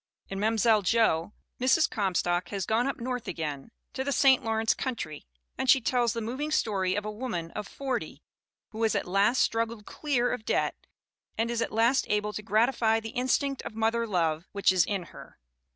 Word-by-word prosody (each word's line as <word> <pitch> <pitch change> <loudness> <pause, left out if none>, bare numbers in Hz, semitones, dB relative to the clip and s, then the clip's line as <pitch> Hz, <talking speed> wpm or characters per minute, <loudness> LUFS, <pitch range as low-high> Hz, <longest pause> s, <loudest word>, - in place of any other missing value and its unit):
In 195 - -4
Mani'selle 220 0 +3
Jo, 200 -4 +2 0.3
Mrs. 260 +6 +4
Comstock 180 -4 0
has 195 -3 -3
gone 230 +4 +1
up 275 - -3
North 250 0 -4
again, 150 -2 -4 0.2
to 265 - -2
the 280 - -2
St. 270 -2 +4
Lawrence 225 -1 +1
country, 185 - -5 0.3
and 265 - -1
she 265 - +7
tells 240 -1 +1
the 230 - -3
moving 260 +7 -3
story 195 -10 0
of 205 0 -2
a 215 - -3
woman 210 -8 -4
of 210 -1 -5
40 265 -3 -4 0.5
who 225 -1 -7
has 225 -1 +2
at - - 0
last 200 +7 +3
struggled 230 -2 -2
clear 250 -5 -1
of 220 - -5
debt - - 0 0.6
and 230 +2 0
is 235 -1 -1
at 230 - -1
last 230 +4 +2
able 210 0 0
to 215 - -4
gratify 225 +1 +2
the 225 0 -7
instinct 260 +2 0
of 215 - -8
moth 225 0 +1
er 235 0 -1
love 170 -4 0
which 200 -1 +3
is 180 -3 +3
in 200 -3 -2
her. - - -13
225 Hz, 195 wpm, -28 LUFS, 200-245 Hz, 0.6 s, she